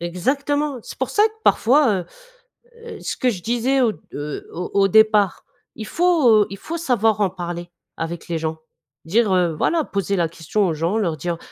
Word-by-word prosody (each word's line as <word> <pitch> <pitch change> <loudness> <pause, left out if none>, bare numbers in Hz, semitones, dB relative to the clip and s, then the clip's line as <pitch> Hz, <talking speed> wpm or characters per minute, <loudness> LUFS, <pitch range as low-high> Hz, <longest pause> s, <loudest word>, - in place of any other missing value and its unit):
Exactement, 275 - -1
c'est - - -10
pour 260 - -2
ça 420 - +3
que - - -20
parfois, 270 +2 +4
heu 175 - -9 0.8
heu, 470 - -8
ce - - -4
que 255 - +2
je 195 -7 -4
disais, 245 +4 +1
heu, 220 -10 +1
au, - - -5
heu, 145 0 -6
au 180 - -5
au 195 0 +4
départ, 215 -2 +3 0.3
il 220 - -6
faut, 340 -5 +3
heu, - - -7
il 200 - -7
faut 330 - -5
savoir 225 - +1
en 195 - +3
parler, 175 -1 -6 0.3
avec 165 +1 -5
les 170 -1 -2
gens. 160 0 -3 0.5
Dire, 210 +5 +2
heu, 175 -3 +2
voilà, 325 - +1
poser 200 -3 -2
la 170 -3 +1
question 170 +5 -1
aux 165 - 0
gens, 165 +7 -1
leur 170 -7 -1
dire: 170 0 -3
200 Hz, 205 wpm, -21 LUFS, 175-255 Hz, 0.8 s, parfois